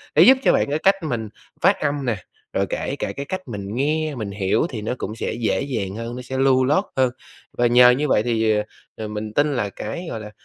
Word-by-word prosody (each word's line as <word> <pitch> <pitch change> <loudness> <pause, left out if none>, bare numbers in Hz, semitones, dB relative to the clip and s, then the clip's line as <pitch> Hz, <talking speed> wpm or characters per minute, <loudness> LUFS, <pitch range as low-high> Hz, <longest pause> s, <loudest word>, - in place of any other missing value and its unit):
để - - +7
giúp 265 +1 +8
cho - - +5
bạn - - +1
cái 150 +2 0
cách 195 +3 +4
mình 115 -8 -3 0.3
phát - - +5
âm 145 -1 -1
nè, 120 -3 +1 0.4
rồi - - +1
kể - - -2
cả - - -2
cái 140 - -5
cách 185 +2 -5
mình 100 -2 -5
nghe, 155 +3 0
mình 110 -5 -4
hiểu 100 - +1
thì 115 -5 -5
nó 110 - -2
cũng 105 -1 -5
sẽ - - -3
dễ 115 -1 0
dàng 110 -9 -3
hơn, 115 +2 -5
nó 125 - -6
sẽ 130 +1 -5
lưu 130 -1 +4
loát 150 +9 +3
hơn. 130 -2 +3 0.5
Và 120 - +4
nhờ 125 +1 +7
như 135 +5 +2
vậy 105 - +3
thì, 110 -2 +2 0.4
ờ, 110 - -5
mình 105 0 -5
tin 145 +4 +2
là 105 -5 -1
cái, 110 - -6
gọi 115 - -4
là, 105 -1 -9
125 Hz, 245 wpm, -22 LUFS, 110-140 Hz, 0.5 s, giúp